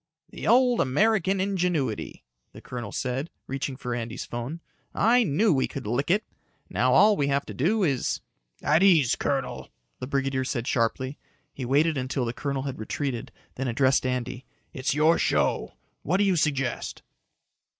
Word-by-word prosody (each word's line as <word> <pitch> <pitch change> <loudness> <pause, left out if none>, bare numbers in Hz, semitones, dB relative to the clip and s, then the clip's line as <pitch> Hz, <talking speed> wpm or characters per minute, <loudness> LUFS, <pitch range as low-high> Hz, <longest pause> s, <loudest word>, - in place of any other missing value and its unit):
"The - - -6
old 250 -1 +5
American 195 +6 +2
ingenuity," 180 - -1 0.3
the - - -10
colonel 120 -5 -7
said, 130 +5 -2 0.2
reaching 135 0 -4
for 125 -2 -4
Andy's 120 0 -4
phone. 120 +8 -5 0.4
"I 240 +3 +4
knew 195 +3 +2
we 130 - +1
could 140 - -7
lick 120 +8 -1
it. 200 +5 +3 0.5
Now - - +2
all 210 0 +6
we 140 -5 0
have 140 0 0
to - - -7
do 200 - +1 0.5
" - - -39
"At 155 +4 +3
ease, 165 -10 +5
colonel," 135 -2 -2 0.3
the 125 - -5
brigadier 135 -1 0
said 120 -2 -3
sharply. 130 +3 -1 0.3
He 130 - -5
waited 145 +4 +2
until 130 0 -2
the 115 - -3
colonel 140 0 -3
had 135 -1 -5
retreated, 120 +2 -3 0.3
then 135 +1 -2
addressed 130 +3 +2
Andy. 125 0 -3 0.3
"It's 130 +1 -1
your 155 +2 +4
show. - - +1 0.3
What 180 +5 +1
do 205 - +3
you 195 -2 +3
suggest?" 140 -5 -1
140 Hz, 160 wpm, -26 LUFS, 125-170 Hz, 0.5 s, all